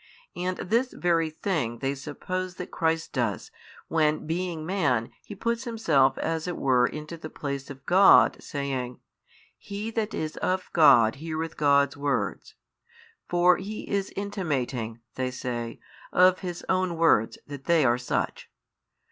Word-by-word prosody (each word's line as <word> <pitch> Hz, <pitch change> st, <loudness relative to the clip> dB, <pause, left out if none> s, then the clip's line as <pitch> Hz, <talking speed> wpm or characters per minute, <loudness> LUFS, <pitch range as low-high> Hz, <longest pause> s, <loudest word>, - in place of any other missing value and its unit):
And 180 Hz, +1 st, -2 dB
this 235 Hz, +6 st, 0 dB
very 165 Hz, -2 st, +1 dB
thing 155 Hz, -, -2 dB
they 135 Hz, +3 st, -1 dB
suppose 180 Hz, +6 st, -5 dB
that 180 Hz, -, -7 dB
Christ 165 Hz, 0 st, -1 dB
does, 120 Hz, -6 st, -2 dB, 0.4 s
when 155 Hz, -1 st, +1 dB
being 165 Hz, -1 st, -3 dB
man 145 Hz, -, 0 dB
He 205 Hz, -, -10 dB
puts 235 Hz, +5 st, -2 dB
Himself 150 Hz, -, +2 dB
as 165 Hz, +1 st, -2 dB
it 175 Hz, -, -3 dB
were 125 Hz, -2 st, +3 dB
into 155 Hz, +4 st, -7 dB
the 155 Hz, -1 st, -8 dB
place 140 Hz, -3 st, -5 dB
of 135 Hz, -1 st, -10 dB
God 190 Hz, +2 st, +6 dB
saying, 135 Hz, -4 st, -4 dB, 0.6 s
He 205 Hz, +3 st, -5 dB
that 220 Hz, -1 st, -2 dB
is 155 Hz, 0 st, -4 dB
of 185 Hz, 0 st, -1 dB
God 120 Hz, -8 st, +6 dB
heareth 160 Hz, +1 st, -4 dB
God's 140 Hz, -1 st, +3 dB
words: 140 Hz, 0 st, -2 dB, 0.7 s
for 175 Hz, 0 st, +4 dB
He 205 Hz, +3 st, -6 dB
is 200 Hz, -1 st, -1 dB
intimating 135 Hz, -, -3 dB
(they 130 Hz, -1 st, -2 dB
say) 120 Hz, -2 st, -5 dB, 0.3 s
of 185 Hz, 0 st, +5 dB
His 175 Hz, -2 st, -6 dB
own 185 Hz, -2 st, 0 dB
words 160 Hz, -9 st, +3 dB
that 145 Hz, -2 st, -9 dB
they 165 Hz, -4 st, +4 dB
are 120 Hz, 0 st, +3 dB
such. 125 Hz, -, -2 dB
160 Hz, 145 wpm, -26 LUFS, 135-185 Hz, 0.7 s, God